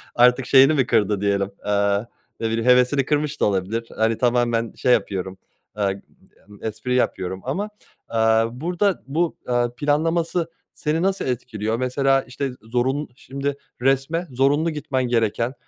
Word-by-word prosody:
artık 125 +1 +5
şeyini 135 +3 +6
mi 135 -4 +2
kırdı 105 -1 +2
diyelim, 100 -1 0
eee, 100 +1 +1 0.3
ne 115 - -1
bileyim 115 +1 -1
hevesini 125 +2 +4
kırmış 150 +1 -1
da - - +5
olabilir, 105 +4 -1
hani, 110 0 +2
tamamen 120 -2 +1
şey 125 - +3
yapıyorum, 95 -4 -1 0.4
eee, 100 -1 -1 0.5
emm, 105 - -15
espri 110 +3 -2
yapıyorum 95 -6 -1
ama, 190 +11 -2 0.4
eee, - - 0 0.3
burada 175 - -1
bu, 160 +4 0
eee, 120 -1 +1
planlaması 165 +4 0 0.2
seni 155 +1 -1
nasıl 195 +1 0
etkiliyor 115 -3 -2
mesela 135 +2 +2
işte 130 +1 -4
zorunlu 125 +6 -1
şimdi 140 +2 -4 0.3
resme 135 +6 +1
zorunlu 140 +6 +2
gitmen 140 -4 -2
gereken 115 +1 0
125 Hz, 140 wpm, -22 LUFS, 110-145 Hz, 0.5 s, şeyini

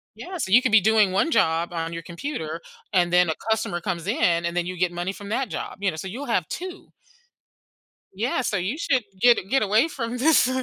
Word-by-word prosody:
Yeah, 365 0 -7
so 190 - -3
you 245 - +7
could 255 -3 0
be 220 -2 +6
doing 215 -1 +4
one 200 - +1
job 165 - +2
on 165 0 -3
your 165 - -5
computer 170 - -5 0.3
and 175 -3 +2
then 180 -2 +5
a 160 - 0
customer 220 -6 0
comes 180 -3 -4
in 175 - +1
and 170 +1 -2
then 175 - +1
you 185 0 -5
get 180 0 +1
money 175 +2 -3
from 200 0 -10
that 245 +2 -1
job, - - -5
you 200 - +2
know, 155 - -8
so 160 - -6
you'll 245 +10 -6
have 185 - 0
2. 365 +1 -7 1.2
Yeah, 230 +6 -1
so 220 -4 -1
you 190 +10 -2
should 265 -7 +1 0.2
get 240 -1 +6
get 270 +1 +2
away 215 +8 +3
from 245 -5 -4
this 290 -1 +4
200 Hz, 225 wpm, -24 LUFS, 175-245 Hz, 1.2 s, you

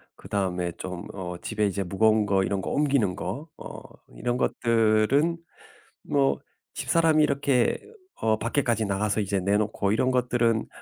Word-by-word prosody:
그다음에 95 -3 -2
좀 90 -1 -6
어 90 -2 -5
집에 105 -2 -1
이제 100 0 -2
무거운 110 +3 +2
거 95 -1 +2
이런 95 0 -1
거 - - -4
옮기는 135 -10 +1
거 135 - -5
어 - - -9 0.3
이런 120 - -1
것들은 115 +9 +2 0.7
뭐 140 -1 +1 0.3
집사람이 160 -2 +2
이렇게 140 -4 +2 0.4
어 110 -1 +1
밖에까지 115 -2 0
나가서 100 +2 0
이제 100 0 -1
내놓고 100 +1 0
이런 130 +4 +2
것들은 120 -3 +1
110 Hz, 295 characters per minute, -26 LUFS, 100-125 Hz, 0.7 s, 무거운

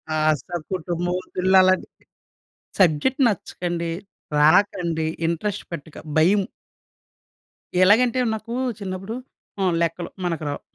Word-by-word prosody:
ఆ! - - +1 0.2
సా 175 - -7 0.2
కుటుంబం 175 0 -2
ఒత్తిడిలు 185 +1 +1
అలాంటి 185 0 +3 0.9
సబ్జెక్ట్ 190 - +3
నచ్చకండి, 175 -4 -2 0.5
రాకండి, 165 0 +3 0.2
ఇంట్రెస్ట్ 195 +5 -2
పెట్టక, 160 -1 -8 0.2
భయం. 190 +6 +5 1.4
ఎలాగంటే, 235 +6 +4 0.2
నాకు 225 +2 -7 0.3
చిన్నప్పుడు 195 +2 -5 0.4
హ్మ్, 185 -2 +2
లెక్కలు 170 +1 -1 0.2
మనకు 165 -3 -2
రావు. - - -4
180 Hz, 100 wpm, -23 LUFS, 170-200 Hz, 1.4 s, భయం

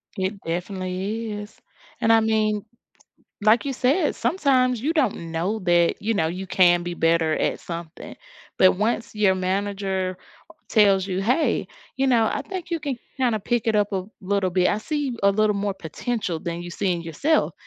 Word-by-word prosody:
It 195 0 -2
definitely 185 +5 -3
is, 210 0 -7 0.5
and 225 - +3
I 225 - +6
mean, 215 -1 +1 0.8
like 215 +3 +4
you 280 - -2
said, 275 +6 +1
sometimes 255 - +1
you 295 +7 0
don't 230 - 0
know 180 +7 -1
that, 175 -2 +2
you 225 +2 0
know, 160 -6 +1
you 185 +3 -5
can 175 -2 +4
be 175 0 -4
better 165 -1 +2
at - - -1
something, 170 -1 -8 0.4
but 185 -1 +6
once 225 +3 -1
your 205 -3 +3
manager 190 0 -2 0.5
tells 200 -3 +4
you, 190 0 -2
"Hey, 250 +10 +1 0.3
you 270 +1 +1
know, 230 -4 +3
I 280 - -2
think 365 +1 -7
you 335 -1 -1
can 280 -3 -3 0.2
kinda 245 -5 +1
pick 240 +3 -1
it 220 -1 +2
up 205 0 +1
a 190 -2 -1 0.2
little 195 -1 0
bit. 180 0 +2
I - - +1
see 285 0 -3
a 200 - +5
little 210 +1 +2
more 200 0 -1
potential 190 +1 -3
than 170 +1 -5
you 175 - -7
see 185 +2 0
in 170 -1 -3
yourself." 225 - +1
200 Hz, 180 wpm, -23 LUFS, 185-230 Hz, 0.8 s, I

